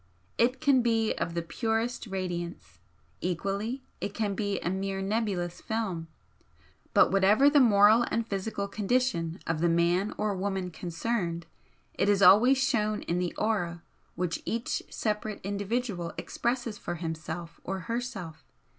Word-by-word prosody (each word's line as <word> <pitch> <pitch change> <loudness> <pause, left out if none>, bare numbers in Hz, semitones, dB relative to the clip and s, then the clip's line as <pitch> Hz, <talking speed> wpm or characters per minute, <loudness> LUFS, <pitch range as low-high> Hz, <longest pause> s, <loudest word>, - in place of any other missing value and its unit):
It 250 +3 +3
can 280 -4 +4
be 225 -2 +2
of 170 - -3
the 170 - -1
purest 225 +6 -2
radiance, 175 - -5 0.4
equally 200 +8 -2 0.2
it 205 - -4
can 210 -3 0
be 205 0 -1
a - - -1
mere 195 0 -2
nebulous 195 -4 -1
film, 195 -7 -3 0.8
but - - +5
whatever 210 +9 +5
the 290 - +6
moral 220 -1 +6
and 230 0 -1
physical 200 0 -3
condition 200 -5 0
of 165 -1 -1
the 170 - +3
man 175 +4 +2
or 210 -2 0
woman 190 -1 -2
concerned 170 0 -2 0.5
it 200 - +1
is 200 -1 +4
always 245 +8 +7
shown 215 -6 +1
in 175 +1 -1
the 180 -1 -2
aura 175 -6 -1 0.3
which 175 -1 -2
each 230 +1 -2
separate 215 -1 -2
individual 200 -2 -2
expresses 235 -3 -2
for - - -4
himself 165 0 -5
or 190 +1 -3
herself. 210 -8 -5
200 Hz, 140 wpm, -29 LUFS, 175-225 Hz, 0.8 s, always